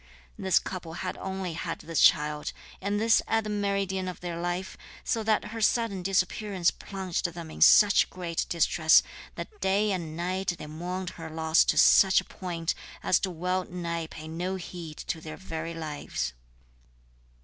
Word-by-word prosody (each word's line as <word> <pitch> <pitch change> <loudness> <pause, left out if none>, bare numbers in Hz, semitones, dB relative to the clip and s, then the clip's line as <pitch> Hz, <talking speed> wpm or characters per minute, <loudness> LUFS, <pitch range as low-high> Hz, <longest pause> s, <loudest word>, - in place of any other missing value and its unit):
This 190 -2 +2
couple 180 -4 -3
had 185 +2 -4
only 190 -2 -4
had 165 0 -4
this 165 -1 -2
child, 150 0 +3 0.3
and 200 +2 -1
this 225 +1 +4
at 225 0 +2
the 210 - -4
meridian 200 -2 -1
of 180 - -6
their 175 -1 -5
life, 175 +2 -3 0.3
so 230 - 0
that 215 -1 +1
her 225 - -4
sudden 220 -3 +1
disappearance 190 0 +1
plunged 190 -3 -4
them 170 -2 -5
in - - -10
such 205 -2 +7
great 175 -3 -3
distress 160 -1 +4 0.3
that 420 -2 -8
day 205 +2 +2
and 165 -4 -3
night 180 +1 -1
they - - -8
mourned 180 +4 -5
her 160 - -6
loss 160 +1 +3
to - - +1
such 190 -1 +7
a - - -6
point 170 -3 -3 0.3
as - - +3
to 190 - -1
well 180 +2 -1
nigh 170 -2 -4
pay 155 0 -9
no 175 +4 -3
heed 170 -4 -7
to 160 - -4
their 155 -1 -8
very 165 -2 -5
lives. 150 - -4
180 Hz, 170 wpm, -28 LUFS, 165-190 Hz, 0.3 s, such